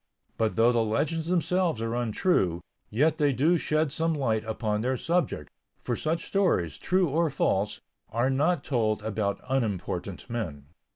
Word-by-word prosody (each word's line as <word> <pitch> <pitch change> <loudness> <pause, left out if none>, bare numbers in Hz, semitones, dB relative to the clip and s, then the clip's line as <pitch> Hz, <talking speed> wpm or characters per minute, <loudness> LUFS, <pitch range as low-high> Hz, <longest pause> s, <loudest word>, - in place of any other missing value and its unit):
But 110 -1 0
though 115 +2 +5
the 115 -2 +2
legends 155 +9 -1
themselves 180 -4 +1
are 115 0 -2
untrue, 110 - +1 0.3
yet 155 +8 +2
they 145 -1 +4
do 155 +7 +3
shed 155 -1 +1
some 165 +2 0
light 115 -7 0
upon 110 -1 -1
their 130 +2 0
subject, 165 - -1 0.3
for 120 - -1
such 160 +5 -2
stories, 130 - +1
true 185 -1 +2
or 165 +3 +2
false, 105 -4 0 0.3
are 120 +4 +1
not 145 +3 +1
told 110 -6 0
about 105 -2 -1
unimportant 100 -7 -2
men. 90 - -4
120 Hz, 155 wpm, -27 LUFS, 110-160 Hz, 0.3 s, though